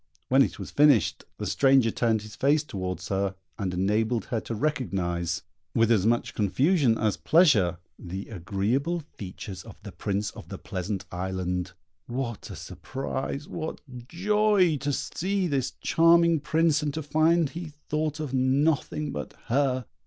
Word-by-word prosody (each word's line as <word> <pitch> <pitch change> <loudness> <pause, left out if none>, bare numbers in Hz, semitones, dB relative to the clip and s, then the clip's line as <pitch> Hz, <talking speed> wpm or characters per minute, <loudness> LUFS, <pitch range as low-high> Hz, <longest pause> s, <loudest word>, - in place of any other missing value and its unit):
When 135 +2 +5
it - - +1
was - - -7
finished, 145 - +4
the - - -4
stranger 135 -4 +4
turned 110 -2 +1
his 110 0 -10
face 145 +3 +3
towards 95 -8 -5
her, 95 0 0 0.2
and 95 -3 -1
enabled 110 +6 0
her 115 - -1
to 115 - -5
recognise, 90 - -1 0.3
with 115 0 +4
as 105 -2 +3
much 120 +1 +1
confusion 130 - +2
as 105 -2 0
pleasure, 120 - +4 0.2
the 95 +3 -6
agreeable 115 - -1
features 95 -1 -7
of - - -13
the - - -8
Prince 100 +1 -2
of - - -12
the - - -6
Pleasant 95 +2 -4
Island. 90 0 -3 0.3
What 120 -2 -4
a 100 - -7
surprise, 135 - -5
what 160 -1 -5 0.3
joy 195 -1 +3
to 145 +2 -2
see 190 +7 -1
this 140 -6 0
charming 170 0 +5
Prince, 155 +1 +2
and 150 -1 -1
to 160 - -3
find 155 +1 +2
he 165 -1 -6 0.2
thought 155 0 -1
of 150 -4 -4
nothing 140 +3 +1
but 75 -3 -5 0.2
her! 130 -1 +1
130 Hz, 150 wpm, -27 LUFS, 100-155 Hz, 0.3 s, When